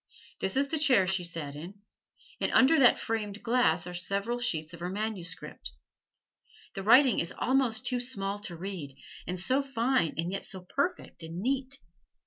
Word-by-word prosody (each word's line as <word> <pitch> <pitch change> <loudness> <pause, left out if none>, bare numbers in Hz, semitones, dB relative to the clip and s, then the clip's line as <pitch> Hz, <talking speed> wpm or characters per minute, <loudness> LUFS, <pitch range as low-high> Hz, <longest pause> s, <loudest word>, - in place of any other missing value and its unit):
This 190 +6 -1
is 280 +1 +2
the 315 - 0
chair 260 -10 +5
she 190 -1 +1
sat 165 -4 -4
in, 170 +7 -8 0.6
and - - 0
under 290 +5 +6
that 250 -3 +6
framed 215 -2 -3
glass 230 -9 +2
are 180 - -7
several 200 +6 -2
sheets 160 -9 -1
of 170 - -9
her 175 +1 -3
manuscript. 195 - -5 1.0
The 195 - -5
writing 250 +4 +6
is 170 - -1
almost 255 -3 +1
too 250 -1 +1
small 205 -5 -2
to 175 -4 -6
read; 170 -7 -6 0.3
and 180 0 -3
so 260 +9 +2
fine 260 - 0
and 170 +2 -2
yet 195 - -3
so 190 -3 -7
perfect 280 - -3
and 165 +1 -7
neat! 265 +4 -2
200 Hz, 170 wpm, -29 LUFS, 175-255 Hz, 1.0 s, under